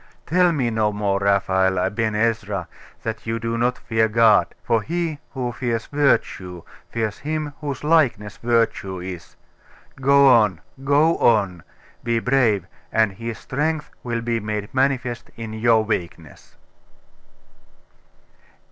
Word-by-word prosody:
Tell 180 +2 +3
me 130 -7 0
no 110 -1 +1
more, 100 -1 0
Raphael 95 -1 +2
Aben 105 +4 0
Ezra, 105 -2 -1 0.4
that 110 0 -5
you 115 0 -1
do 115 0 -3
not 120 +2 0
fear 110 -1 +1
God; 110 -1 +4 0.2
for 115 -2 +1
he 165 +2 -3 0.2
who 125 -2 -2
fears 120 -2 -2
Virtue, 95 - 0 0.3
fears 110 -3 -3
Him 155 0 -3
whose 145 -2 -4
likeness 140 -11 +2
Virtue 115 -5 0
is. 90 -2 -8 0.6
Go 140 +1 +5
on 105 -9 +4 0.2
go 145 +4 +3
on.... 100 -7 +2 0.4
Be 115 0 0
brave, 115 -6 +2 0.3
and 110 -2 +2
His 115 +3 -6
strength 155 +3 -2
will 120 -1 -3
be 115 0 -1
made 105 -1 -4
manifest 130 -3 0
in 115 -1 -6
your 110 0 +3
weakness. 85 -7 -5
115 Hz, 130 wpm, -22 LUFS, 105-130 Hz, 0.6 s, Go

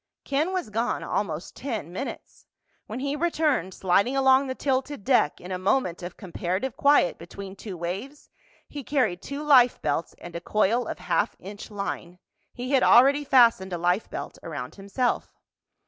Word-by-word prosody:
Ken 295 +6 0
was 365 - -3
gone 230 +3 -1
almost 165 -4 -3
ten 215 - -5
minutes. 270 +9 -7 0.4
When 230 +4 -5
he 280 +1 -1
returned, 300 - 0
sliding 200 +8 +2
along 265 0 +5
the 260 - -3
tilted 270 -3 -1
deck 245 - +2
in 180 - -9
a 185 - -2
moment 185 -2 0
of 175 0 -7
comparative 185 +5 -3
quiet 285 -10 +3
between 190 +3 -9
two 195 -2 -8
waves, 195 - -6 0.4
he 290 -2 -7
carried 240 -11 0
two 280 +2 -5
life 255 -5 +5
belts 165 - -2
and 175 -1 -10
a 170 - -4
coil 215 +6 +1
of - - -4
half - - 0
inch 205 +3 -9
line. 200 -4 -5 0.3
He 250 +2 -6
had 270 -2 +4
already 275 +5 +6
fastened 230 -9 +4
a - - -1
life 180 +4 0
belt - - -7
around - - -6
himself. 200 +6 -2
230 Hz, 165 wpm, -26 LUFS, 185-270 Hz, 0.4 s, already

